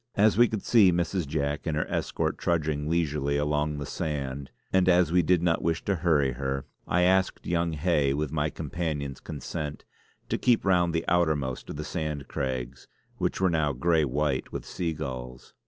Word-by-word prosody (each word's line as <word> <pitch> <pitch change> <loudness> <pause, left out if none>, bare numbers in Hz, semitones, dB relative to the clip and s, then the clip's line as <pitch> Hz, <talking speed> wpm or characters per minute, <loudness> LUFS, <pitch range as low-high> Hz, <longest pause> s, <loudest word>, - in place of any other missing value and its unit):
As 105 +1 +4
we 120 +2 +6
could 110 -3 -4
see 105 -6 +6
Mrs. 85 -1 -1
Jack 75 0 -2
and 75 -2 0
her 75 - 0
escort - - -2
trudging 75 -3 0
leisurely 75 -4 0
along 75 0 0
the 70 - -4
sand, 70 -3 -4 0.2
and 95 -1 +4
as 90 -2 +4
we 90 0 +4
did 85 +1 +2
not 85 -2 +2
wish 80 0 -1
to 100 -2 +1
hurry 80 -5 +2
her, 70 +1 -3 0.2
I 90 +1 +2
asked 95 +1 +2
young 85 -1 0
Hay 75 -3 +1
with 75 -1 -2
my 75 0 0
companion's 75 -4 -4
consent, 75 0 -6 0.4
to - - -1
keep 120 -5 +3
round 90 -3 +3
the 80 - 0
outermost 80 -7 0
of - - -5
the 75 - -4
Sand 75 -4 -4
Craigs, 65 0 -4 0.3
which - - -1
was 95 -1 +3
now 75 -3 +1
grey 80 +5 +2
white 70 0 -1
with - - -5
sea 85 -3 -2
gulls. 65 -4 -7
75 Hz, 185 wpm, -27 LUFS, 70-85 Hz, 0.4 s, we